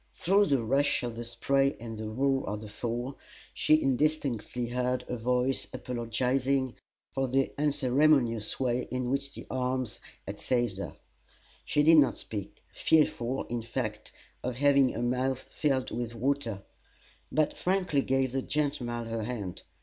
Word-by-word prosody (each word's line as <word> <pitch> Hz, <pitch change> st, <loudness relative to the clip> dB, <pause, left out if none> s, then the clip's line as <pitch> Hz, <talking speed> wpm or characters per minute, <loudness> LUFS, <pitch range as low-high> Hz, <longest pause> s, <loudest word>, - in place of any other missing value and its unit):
Through 200 Hz, +3 st, +3 dB
the 135 Hz, -6 st, +2 dB
rush 135 Hz, +4 st, +2 dB
of 120 Hz, -2 st, -3 dB
the 120 Hz, -, -5 dB
spray 135 Hz, +4 st, +1 dB
and 115 Hz, -1 st, -6 dB
the 110 Hz, 0 st, -5 dB
roar 135 Hz, +4 st, +1 dB
of 105 Hz, 0 st, -3 dB
the 110 Hz, -, -8 dB
Fall 120 Hz, +5 st, -4 dB, 0.3 s
she 155 Hz, -, +4 dB
indistinctly 135 Hz, -4 st, 0 dB
heard 125 Hz, +1 st, -1 dB
a 125 Hz, -, -2 dB
voice 125 Hz, +3 st, 0 dB
apologizing 125 Hz, +2 st, 0 dB, 0.4 s
for 135 Hz, 0 st, 0 dB
the 135 Hz, +1 st, +1 dB
unceremonious 135 Hz, -5 st, +3 dB
way 125 Hz, -1 st, 0 dB
in 125 Hz, -1 st, -2 dB
which 140 Hz, 0 st, -2 dB
the -, -, -8 dB
arms 130 Hz, -2 st, -1 dB, 0.3 s
had -, -, -6 dB
seized 120 Hz, -6 st, 0 dB
her. -, -, -5 dB, 0.7 s
She 150 Hz, -, +2 dB
did 160 Hz, +1 st, +7 dB
not 145 Hz, -3 st, +5 dB
speak 105 Hz, -3 st, -7 dB
fearful, 135 Hz, -5 st, +2 dB
in 120 Hz, -1 st, -3 dB
fact, 110 Hz, -2 st, -4 dB, 0.3 s
of 125 Hz, -1 st, -2 dB
having 140 Hz, 0 st, +4 dB
her 115 Hz, -, -2 dB
mouth 130 Hz, +2 st, +1 dB
filled 135 Hz, -4 st, -1 dB
with 120 Hz, 0 st, -3 dB
water 115 Hz, -5 st, -1 dB, 0.7 s
but 155 Hz, -1 st, +2 dB
frankly 180 Hz, -6 st, +1 dB
gave 135 Hz, -1 st, +1 dB
the 135 Hz, +1 st, -1 dB
gentleman 130 Hz, -6 st, -1 dB
her 115 Hz, -1 st, -3 dB
hand. 105 Hz, -7 st, -5 dB
125 Hz, 150 wpm, -29 LUFS, 120-140 Hz, 0.7 s, did